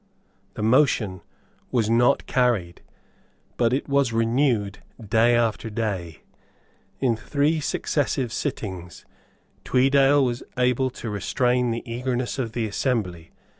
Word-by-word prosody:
The - - -4
motion 110 - +2 0.5
was 115 -4 +1
not 120 +4 +3
carried; 115 -9 0 0.7
but 115 -1 +2
it 130 - -1
was 140 -3 +2
renewed 115 -3 +1 0.2
day 115 +2 +3
after 115 -1 0
day. 95 - -4 0.8
In 125 -4 +2
three 145 +7 0
successive 135 -4 -1
sittings 95 - -5 0.6
Tweedale 135 +2 +4
was 120 -1 -2 0.2
able 125 +1 +2
to 120 -3 -7
restrain 125 +4 0
the 115 0 -3
eagerness 125 +1 -3
of 115 -4 -3
the 115 -2 -1
assembly. 100 -7 -2
120 Hz, 115 wpm, -24 LUFS, 110-130 Hz, 0.8 s, Tweedale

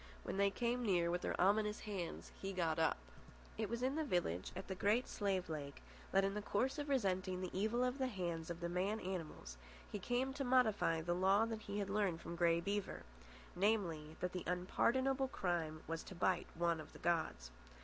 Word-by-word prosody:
When - - -3
they 200 0 +4
came 240 +4 0
near 175 -5 +3
with 175 +1 0
their - - -2
ominous 210 +2 +3
hands, 195 -6 -5
he 195 0 -3
got 165 -3 +1
up. 160 - +3 0.6
It 215 -2 -2
was 235 +2 -2
in 270 +4 +1
a - - +1
village 175 - 0
at 190 - -5
the 190 - -2
Great 210 +6 +2
Slave 195 -3 0
Lake, 145 -3 -5 0.3
that, 195 0 +4
in 195 0 +1
the 210 - -2
course 255 +9 0
of 290 0 -3
resenting 190 -8 +1
the 185 -1 -4
evil 220 +6 +1
of 250 +2 0
the 260 - +2
hands 175 -7 -3
of 170 0 -5
the 170 - 0
man 190 +5 0
animals, 165 - -5 0.3
he 205 - -3
came 245 +6 0
to 275 - -2
modify 220 -10 +3
the 175 +2 0
law 190 +4 +4
that 225 -1 -4
he 205 -1 -4
had 200 -1 -1
learned 200 -5 +1
from 170 +1 -6
Grey 170 -1 +4
Beaver: 200 +3 -2 0.5
namely, 175 -6 +1
that 180 - 0
the 180 - -3
unpardonable 260 +9 +2
crime 170 -8 -2
was 165 0 -3
to 190 - -8
bite 175 0 +1
one 170 -1 +2
of - - -12
the - - -10
gods. 160 - 0
190 Hz, 205 wpm, -39 LUFS, 170-220 Hz, 0.6 s, they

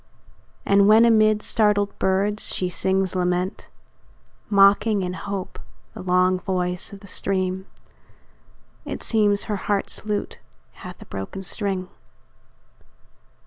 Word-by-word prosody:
And 200 0 +4
when 220 +2 +6
amid 215 -2 +3
startled 210 -2 +1
birds 200 +2 +1
she 180 - -1
sings 190 +1 0
lament, 180 +1 -2 0.8
Mocking 200 +1 +4
in 180 0 -3
hope 195 0 -6 0.3
the - - -9
long 185 0 +2
voice 180 -1 -2
of 200 -1 -11
the 200 - -13
stream, 190 0 -2 1.2
It - - -6
seems 205 -3 +2
her 210 -2 -3
heart's 200 +1 -2
lute 210 -1 -3 0.3
hath - - -11
a - - -18
broken 95 - -7
string. 190 -1 -2
195 Hz, 115 wpm, -23 LUFS, 185-205 Hz, 1.2 s, when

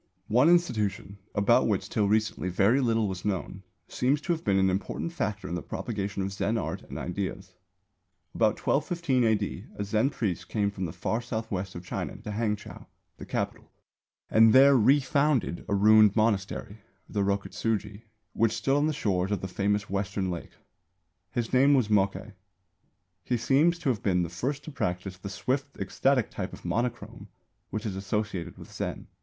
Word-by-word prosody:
One 125 +8 +5
institution, 105 - +1 0.2
about 100 -1 +4
which - - 0
till 105 -2 +1
recently 110 -3 0
very 105 +9 +3
little 115 -3 +2
was 95 -2 -5
known, 95 -1 -3 0.3
seems 135 +4 +1
to 175 - -2
have 160 - -5
been 100 -2 +2
an 95 -1 +3
important 100 - -3
factor 105 - -3
in - - -5
the 90 - -2
propagation 100 - -4
of 95 0 -3
Zen 100 +3 0
art - - -3
and - - -9
ideas. 95 +2 -4 0.8
About 110 -2 +2
1215 150 -4 +1
A.D. 110 -2 0
a 100 - -3
Zen 110 +5 +1
priest 105 - -3
came 100 -2 0
from 95 -2 -4
the 80 - -4
far 110 +7 -2
south 115 -2 -4
west 95 -1 -3
of 85 0 -8
China - - -4
to 105 - -7
Hangchow, 105 -1 -3 0.3
the - - -10
Capital, - - -3 0.6
and 110 0 +6
there 135 +1 +8
refounded 135 - +2
a 100 - +2
ruined 105 0 +6
monastery, 110 0 0 0.3
the 105 - -2
Rokutsūji, 100 +1 -1 0.3
which 115 0 +2
stood 135 - +1
on 145 +1 +2
the 155 - 0
shores 95 -8 0
of 105 - -1
the 95 - -3
famous 105 +2 0
Western 95 -1 -2
Lake. 85 - -7 0.8
His 120 -1 -3
name 140 +3 +5
was 125 -6 +2
Mokkei. 100 +1 +1 0.9
He 120 +6 0
seems 150 +9 +3
to 170 -5 -1
have 115 -5 0
been 90 -3 +2
the 85 - -3
first 135 - -3
to 155 - -8
practise 90 -6 -3
the 100 - -6
swift, 135 +9 -2
ecstatic 135 -4 +1
type - - -5
of - - -11
monochrome 120 +1 -3 0.4
which 110 0 -4
is 100 -3 -3
associated 100 -2 -3
with - - -12
Zen. - - -4
105 Hz, 175 wpm, -28 LUFS, 100-125 Hz, 0.9 s, there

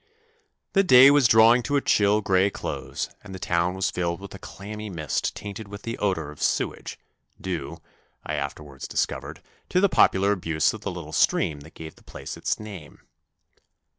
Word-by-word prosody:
The 195 - +5
day 135 -5 +8
was 145 -4 +5
drawing 115 +3 +6
to 145 +4 -2
a 140 - +3
chill 105 -2 +3
grey 95 -1 +3
close, 65 -7 -5 0.2
and 95 -2 -9
the - - -5
town 85 0 0
was 95 0 -1
filled 85 -1 -2
with 100 0 -10
a 95 - -9
clammy 105 +3 -8
mist 80 -5 -2
tainted 105 +1 -7
with 100 +1 -10
the 115 0 -4
odour 85 -7 -1
of 75 - -13
sewage, - - -1 0.4
due, 90 -8 -4 0.5
I 75 - -3
after 70 +1 -4
wards 70 -3 -9
discovered, - - -3 0.3
to 180 - +2
the 200 +1 +4
popular 100 - +4
abuse 80 -5 +1
of - - -8
the - - -3
little 85 -3 -8
stream 75 -1 +2
that 75 +3 -15
gave 80 -1 -10
the - - -21
place - - -8
its - - -2
name. 100 -8 -10
95 Hz, 185 wpm, -25 LUFS, 80-105 Hz, 0.5 s, day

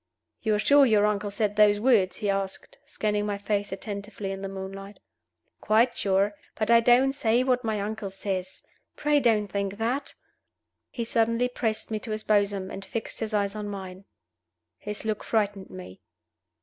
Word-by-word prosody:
"You 215 -2 +1
are - - +1
sure 285 +7 +5
your 215 -5 +4
uncle 210 -1 0
said 205 0 -1
those 205 -1 +5
words?" 205 -6 +3
he 210 -2 -2
asked, 195 -1 -4
scanning 210 -1 -1
my 205 -1 -2
face 205 0 -2
attentively 200 0 -5
in 195 0 -5
the 195 - -4
moonlight. 195 +1 -8 0.6
"Quite 225 +3 +3
sure. 195 +1 +2 0.2
But 215 +1 0
I 235 - +8
don't 245 +3 +4
say 240 -2 +2
what 255 -1 +1
my 220 -2 -1
uncle 210 0 -4
says. 190 -1 -5 0.3
Pray 295 0 +2
don't 225 -5 +3
think 200 0 -3
that!" 245 +6 -2 0.7
He 235 - -4
suddenly 230 +1 +1
pressed 225 -3 -2
me 215 - -1
to 225 - -7
his 215 0 -2
bosom, 200 -2 +1
and 195 - -6
fixed 220 +3 -5
his 220 -1 -2
eyes 200 -1 +1
on 210 -1 -4
mine. 190 -1 -7 0.7
His 210 +1 -6
look 215 -1 -2
frightened 205 -3 -1
me. 95 0 -10
210 Hz, 175 wpm, -27 LUFS, 195-225 Hz, 0.7 s, I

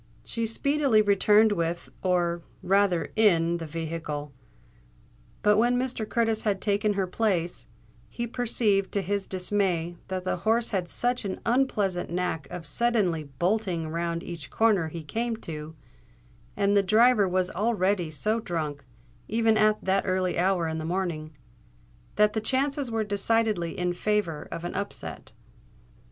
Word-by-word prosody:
She 230 - -3
speedily 275 -1 +2
returned 210 +2 +4
with, 170 -3 -2
or 175 -2 +1 0.2
rather 195 -2 +2
in 170 -6 +3
the 165 -1 -6
vehicle; 155 -2 -5 1.1
but 210 0 +5
when 240 +2 +3
Mr. 245 -4 -2
Curtis 225 -2 +1
had 205 -3 0
taken 205 +1 +1
her 195 -1 0
place, 180 -3 -1 0.4
he 235 - -4
perceived 220 -5 0
to 200 - 0
his 200 +1 -2
dismay 180 -3 -1
that 185 -1 -3
the 185 - -1
horse 225 +5 +1
had 185 -4 -1
such 245 +5 -1
an 195 -2 -4
unpleasant 215 -7 +1
knack 170 -4 -2
of 175 -2 -7
suddenly 185 - +1
bolting 175 +3 -1
round 170 +1 -2
each 165 -5 -7
corner 210 -7 +2
he 160 +1 -7
came 225 +9 -2
to, 155 0 -6 0.8
and 200 0 +2
the 200 - +6
driver 215 0 +4
was 185 0 +1
already 195 -3 0
so 215 +9 0
drunk, 155 -8 -4 0.4
even 225 0 +2
at 215 0 +2
that 190 +1 +2
early 185 -1 0
hour 180 -1 +1
in 160 0 -3
the - - -4
morning, 160 -4 -3 0.8
that 210 0 +4
the 220 - -1
chances 275 +3 0
were 225 -1 0
decidedly 205 -3 0
in 180 0 0
favour 180 -5 -1
of 165 - -5
an 175 - -4
upset. 200 +1 -5
195 Hz, 145 wpm, -27 LUFS, 170-220 Hz, 1.1 s, the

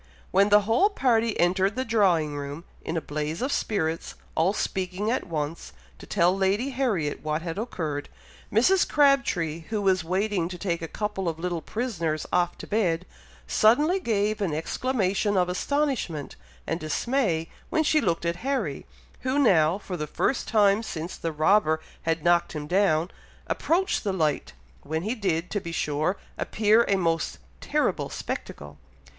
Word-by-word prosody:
When 200 +1 +4
the 210 0 +6
whole 225 - +3
party 230 - +1
entered 185 +3 +2
the 260 - -1
drawing 180 - +2
room, 145 +3 -5 0.2
in 165 - -3
a - - -1
blaze 150 +2 -3
of 265 +3 -1
spirits, 165 - -1 0.2
all 165 +4 +2
speaking 190 +1 -2
at 255 - -1
once, 155 - -4 0.3
to - - -12
tell 175 +2 +3
Lady 195 +7 +1
Harriet 215 - -1
what 155 +1 -1
had 170 +2 -4
occurred, 155 -10 -3 0.4
Mrs. 345 - +4
Crabtree, 235 - +2
who 220 -1 -1
was 190 -3 +2
waiting 185 0 0
to 180 - -6
take 170 -2 -2
a 165 - -4
couple 200 -1 -2
of 160 - -4
little 175 0 -3
prisoners 170 -11 -2
off 175 -1 +1
to - - -8
bed, 180 -5 0 0.4
suddenly 295 - +4
gave 215 - 0
an 170 -7 0
exclamation 200 +2 0
of 180 -1 +2
astonishment 245 - -1 0.3
and 165 - -2
dismay 165 - 0 0.2
when 320 -2 +2
she 305 0 +3
looked 170 -5 0
at 170 0 0
Harry, 270 +6 -2 0.3
who 260 +2 -1
now, 175 - +4
for 190 -3 -6
the 150 - -3
first 260 - -1
time 205 -1 +4
since 170 -5 -5
the 165 - -3
robber 160 +1 +3 0.2
had 165 -1 -1
knocked 175 0 +3
him 150 -2 -4
down, 175 -1 +2 0.3
approached 360 +4 0
the 200 - 0
light, 155 - 0 0.3
when 160 +3 -3
he 215 +4 -1
did, 180 -7 -1
to 205 - -1
be 170 - -6
sure, 155 +3 0 0.2
appear 220 +2 +3
a 200 - +3
most 165 -3 0 0.2
terrible - - 0
spectacle! 75 0 -6
185 Hz, 160 wpm, -26 LUFS, 165-220 Hz, 0.4 s, the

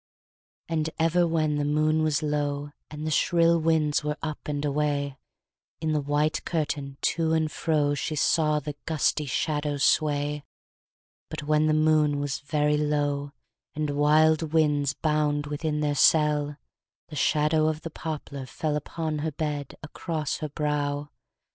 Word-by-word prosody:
And 160 -1 -1
ever 170 +2 +3
when 155 -2 +1
the 145 - 0
moon 155 +2 +2
was 155 -1 +1
low, 145 -1 -2 0.2
And 150 0 -6
the 155 - -1
shrill 170 +1 +3
winds 155 -2 +1
were 150 0 -2
up 155 -2 -5
and 145 0 -2
away, 145 -1 -1 0.6
In 160 -1 -1
the 150 - +1
white 145 +2 0
curtain, 145 -4 -3
to 160 -1 +1
and 160 -1 +1
fro, 150 -3 +1
She 150 +2 -2
saw 150 0 +2
the 150 0 -6
gusty 155 -1 +1
shadow 145 +2 -1
sway. 145 0 +1 0.9
But 155 -1 -5
when 155 +1 +2
the 155 - +3
moon 155 -2 +3
was 145 -1 -2
very 150 0 +1
low, 145 -1 -1 0.4
And 150 -1 -1
wild 155 +2 +3
winds 145 -3 +2
bound 150 -2 0
within 150 +1 -2
their 145 -1 +1
cell, 150 -1 +3 0.5
The 155 - -8
shadow 155 +2 +2
of 155 0 -1
the 165 - -7
poplar 145 -4 -6
fell 150 +5 -2
Upon 155 +1 -3
her 155 +1 -2
bed, 145 -2 -4
across 155 -1 -3
her 155 - -4
brow. 145 -1 -2
150 Hz, 150 wpm, -26 LUFS, 145-155 Hz, 0.9 s, ever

